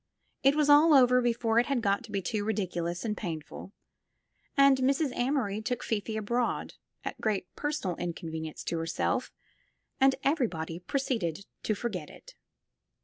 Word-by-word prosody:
It 275 Hz, +1 st, +4 dB
was 300 Hz, -1 st, +2 dB
all 295 Hz, +2 st, +7 dB
over 250 Hz, -1 st, +6 dB
before 235 Hz, -1 st, +2 dB
it 240 Hz, -, +1 dB
had 270 Hz, -5 st, 0 dB
got 200 Hz, +2 st, +1 dB
to 220 Hz, -, -13 dB
be 200 Hz, -2 st, -2 dB
too 210 Hz, +2 st, -1 dB
ridiculous 180 Hz, -4 st, -2 dB
and 210 Hz, -2 st, -1 dB
painful, 165 Hz, 0 st, -6 dB, 0.9 s
and 275 Hz, -1 st, +6 dB
Mrs. 270 Hz, +1 st, +1 dB
Amory 245 Hz, -5 st, 0 dB
took 245 Hz, +2 st, -3 dB
Fifi 220 Hz, 0 st, -2 dB
abroad, 235 Hz, +3 st, -1 dB, 0.3 s
at -, -, -5 dB
great 205 Hz, -4 st, 0 dB, 0.5 s
inconvenience 160 Hz, -2 st, -5 dB
to 165 Hz, -, -2 dB
her 165 Hz, -, -3 dB
self, -, -, -1 dB, 0.7 s
and 270 Hz, 0 st, +5 dB
everybody 180 Hz, -, 0 dB
proceeded 200 Hz, -, -2 dB, 0.2 s
to 215 Hz, -, 0 dB
forget 195 Hz, -8 st, -4 dB
it. -, -, -14 dB
220 Hz, 145 wpm, -29 LUFS, 180-260 Hz, 0.9 s, all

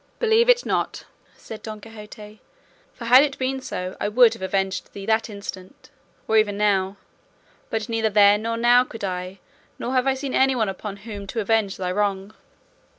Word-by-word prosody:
"Believe 460 Hz, +1 st, +3 dB
it -, -, +4 dB
not," -, -, -2 dB, 0.3 s
said 220 Hz, -, -10 dB
Don 215 Hz, -1 st, -7 dB
Quixote, 210 Hz, -1 st, -12 dB, 0.5 s
"for 235 Hz, -, -10 dB
had 250 Hz, +3 st, +8 dB
it 285 Hz, -2 st, -2 dB
been 265 Hz, 0 st, -2 dB
so, 185 Hz, -6 st, -5 dB
I -, -, 0 dB
would 235 Hz, +1 st, +5 dB
have -, -, -11 dB
avenged 190 Hz, 0 st, -2 dB
thee 200 Hz, -1 st, -8 dB
that 220 Hz, +1 st, +1 dB
instant, 200 Hz, +3 st, -9 dB, 0.4 s
or 220 Hz, -, +3 dB
even 205 Hz, -2 st, +2 dB
now; 200 Hz, -2 st, +1 dB, 0.7 s
but 220 Hz, -1 st, -3 dB
neither 225 Hz, -1 st, 0 dB
then 205 Hz, 0 st, +5 dB
nor 230 Hz, +1 st, -2 dB
now 240 Hz, +1 st, +5 dB
could 225 Hz, -4 st, -10 dB
I, 185 Hz, 0 st, -4 dB, 0.4 s
nor 250 Hz, -, -4 dB
have 255 Hz, 0 st, +1 dB
I 265 Hz, -, +2 dB
seen 265 Hz, 0 st, -5 dB
anyone 260 Hz, -5 st, +2 dB
upon 195 Hz, +1 st, -6 dB
whom 205 Hz, -3 st, -7 dB
to 225 Hz, -, -4 dB
avenge 215 Hz, -2 st, 0 dB
thy 180 Hz, -1 st, -2 dB
wrong." 200 Hz, +1 st, -1 dB
215 Hz, 180 wpm, -23 LUFS, 200-240 Hz, 0.7 s, had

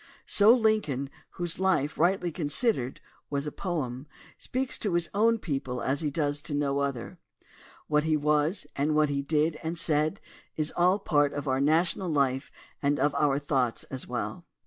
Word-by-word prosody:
So 210 Hz, +2 st, +6 dB
Lincoln, 215 Hz, -, +1 dB, 0.2 s
whose 175 Hz, -1 st, -2 dB
life, 170 Hz, -6 st, +1 dB
rightly 175 Hz, +1 st, +1 dB
considered, 150 Hz, -, -1 dB, 0.3 s
was 140 Hz, 0 st, -2 dB
a 150 Hz, -, -3 dB
poem, 145 Hz, -8 st, -4 dB, 0.3 s
speaks 260 Hz, 0 st, -3 dB
to 200 Hz, -5 st, -1 dB
his 175 Hz, -1 st, 0 dB
own 225 Hz, +3 st, +3 dB
people 135 Hz, -, -3 dB
as 135 Hz, +5 st, -1 dB
he 150 Hz, -, 0 dB
does 145 Hz, 0 st, -1 dB
to 145 Hz, -, -4 dB
no 140 Hz, -1 st, 0 dB
other. 140 Hz, -4 st, -3 dB, 0.7 s
What 150 Hz, 0 st, +2 dB
he 155 Hz, -1 st, +2 dB
was, 150 Hz, +4 st, +1 dB
and 150 Hz, +2 st, 0 dB
what 155 Hz, -1 st, +3 dB
he 140 Hz, -1 st, -1 dB
did 155 Hz, +2 st, 0 dB
and 165 Hz, +1 st, -3 dB
said, 155 Hz, +3 st, +1 dB, 0.4 s
is 155 Hz, -1 st, 0 dB
all 180 Hz, +3 st, +4 dB
part 145 Hz, -7 st, +1 dB
of 145 Hz, 0 st, -4 dB
our 130 Hz, 0 st, +1 dB
national 170 Hz, +5 st, +2 dB
life 135 Hz, -3 st, 0 dB, 0.3 s
and 145 Hz, 0 st, +1 dB
of 145 Hz, +1 st, +2 dB
our 140 Hz, -2 st, +2 dB
thoughts 135 Hz, -5 st, 0 dB
as 130 Hz, -1 st, -5 dB
well. 165 Hz, +8 st, -4 dB
150 Hz, 170 wpm, -28 LUFS, 140-175 Hz, 0.7 s, So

